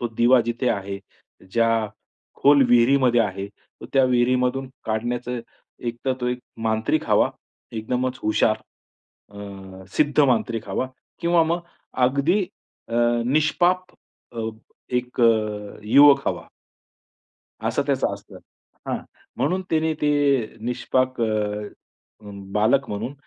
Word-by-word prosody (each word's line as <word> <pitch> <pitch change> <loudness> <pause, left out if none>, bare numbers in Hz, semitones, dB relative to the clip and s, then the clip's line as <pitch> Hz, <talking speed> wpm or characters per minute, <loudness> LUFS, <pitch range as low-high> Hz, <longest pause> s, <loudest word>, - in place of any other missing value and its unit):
तो 120 - -1
दिवा 125 +2 +5
जिथे 120 +2 -1
आहे. 100 0 -3 0.5
ज्या 115 -2 +2 0.5
खोल 140 0 +5
विहिरीमध्ये 120 0 +4
आहे. 100 -2 -2 0.3
तर - - -8
त्या 135 -1 +5
विहिरीमधून 125 +1 +1 0.2
काढण्याचं 120 +2 -2 0.5
एकतर 120 +3 -2
तो 125 - -1
एक 125 0 -2 0.2
मांत्रिक 110 0 0
हवा, - - +4 0.4
एकदमच 125 +3 -2
हुशार. 110 0 +2 0.7
अ, 95 -2 -10
सिद्ध 150 0 +3
मांत्रिक 115 -5 +1
हवा 100 +7 -1 0.3
किंवा 170 -1 +3
मग 170 +2 0 0.5
अगदी 140 +10 +2 0.5
अ, 115 - -5 0.3
निष्पाप 155 +6 +2 0.5
अ, 115 - -5 0.6
एक 125 +1 -6
अ, 110 -3 +1
युवक 140 +5 +6
हवा. - - -4 1.2
असं - - 0
त्याचं - - 0
असतं. - - -11 0.5
हां, - - -1 0.4
म्हणून 185 +1 0
तिने 160 0 +2
ते 150 0 +3 0.5
निष्पाक 130 +1 0
अ, - - +3 1.3
बालक 110 +6 +2
म्हणून 110 +6 -4
125 Hz, 115 wpm, -23 LUFS, 110-135 Hz, 1.3 s, युवक